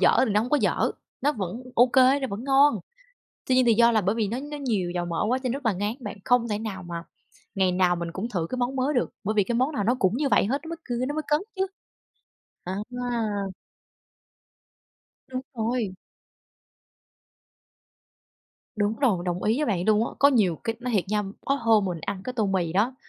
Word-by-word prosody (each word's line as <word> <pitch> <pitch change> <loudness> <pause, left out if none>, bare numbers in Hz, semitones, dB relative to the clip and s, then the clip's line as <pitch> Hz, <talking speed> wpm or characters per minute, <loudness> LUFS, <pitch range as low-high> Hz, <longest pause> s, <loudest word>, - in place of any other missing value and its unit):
dở - - +5
thì 220 - -1
nó 210 - +3
hông 240 +3 -3
có 295 - +4
dở, - - +1 0.3
nó 290 - +2
vẫn 210 - -5
ô 245 +2 +6
kê, 260 +2 +4
nó 265 - -1
vẫn 205 +5 -5
ngon, 280 +1 +4 0.7
tuy 255 - +2
nhiên 255 - +5
thì 235 -2 +5
do 235 +1 +5
là 220 - +3
bởi 200 +2 0
vì 220 -3 0
nó 235 - -2
nó 295 +1 -6
nhiều 215 -11 -1
dầu 175 0 -2
mỡ 170 +3 -1
quá 255 - +2
cho 255 - -1
rất 275 -2 -4
là 220 - +4
ngán 205 +4 -1
bạn, 240 - -6
không 245 -1 +3
thể 210 - -1
nào 210 -4 -5
mà 170 -1 -6 0.5
ngày 190 -2 +2
nào 180 -1 +3
mình 170 -1 -4
cũng 220 +5 -4
thử 175 -7 -2
cái 255 - -2
món 250 +2 -1
mới 270 +3 0
được, 245 - +1
bởi 215 - 0
vì 205 -2 +3
cái 235 - -2
món 260 +6 +1
nào 205 - -1
nó 235 +4 +3
cũng 190 +4 +2
như 285 -1 +1
vậy - - +4
hết, 270 +6 0
nó 320 - -8
mới 335 - -4
cừ 245 0 -2
nó 290 - -3
mới 310 - -1
cấn 295 0 +2 0.2
chứ. 385 0 +1 1.0
À 185 +1 -3 0.3
ha. 240 -2 -1 2.0
Đúng 255 0 -3
rồi. 225 -3 -1 2.8
Đúng 210 +1 0
rồi, 215 -11 +2
đồng 175 0 -2
ý 220 +3 +2
với 300 - 0
bạn 180 -5 0
luôn 215 +2 +3
á. - - -6
Có 280 - +7
nhiều 200 - +3
c 230 0 -4
nói 250 -1 -2
thiệt 195 - +2
nha, 210 0 +1 0.2
có 275 - +2
hôm 225 -5 +3
mình 175 -4 -3
ăn 195 +2 -4
cái 255 - -4
tô 225 -4 0
mì 180 -4 0
đó, 220 +7 +1
225 Hz, 225 wpm, -26 LUFS, 195-255 Hz, 2.8 s, Có